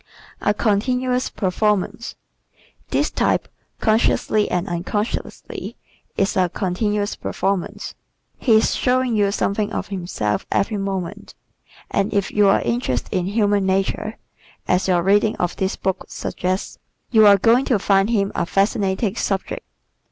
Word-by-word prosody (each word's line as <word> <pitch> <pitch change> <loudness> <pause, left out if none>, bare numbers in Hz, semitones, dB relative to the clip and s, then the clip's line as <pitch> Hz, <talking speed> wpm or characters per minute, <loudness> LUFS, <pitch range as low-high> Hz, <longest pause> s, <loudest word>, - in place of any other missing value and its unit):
A - - +2
Continuous 250 +5 0
Performance 210 +3 -1 0.7
¶ - - -40
This - - +1
type, - - +1 0.3
consciously 215 -1 +2
and 180 +2 -1
unconsciously, 200 +5 -4 0.4
is 195 - +1
a 185 -2 +2
"continuous 205 +3 -1
performance." 190 -1 -3 0.5
He 235 - +3
is 220 - +4
showing 255 -1 +1
you 205 -2 +2
something 205 +1 -1
of - - -4
himself 175 - -2
every 210 +1 +1
moment 195 -3 -4 0.6
and 195 - 0
if 200 -2 0
you 205 -1 +4
are 195 - +4
interested 120 +1 -1
in 180 -1 0
human 205 -1 +1
nature, 195 +3 -1 0.5
as 180 +1 +2
your 175 -2 +2
reading 205 +3 +3
of 175 0 -2
this 190 0 -1
book 190 -1 -2
suggests, 185 +2 -3 0.3
you 220 -3 +7
are 200 -1 +8
going 230 +7 +4
to 245 - +2
find 195 +1 +2
him 200 -4 +1
a - - -1
fascinating 195 +1 +1
subject. 195 -4 -2
200 Hz, 135 wpm, -21 LUFS, 190-215 Hz, 0.7 s, are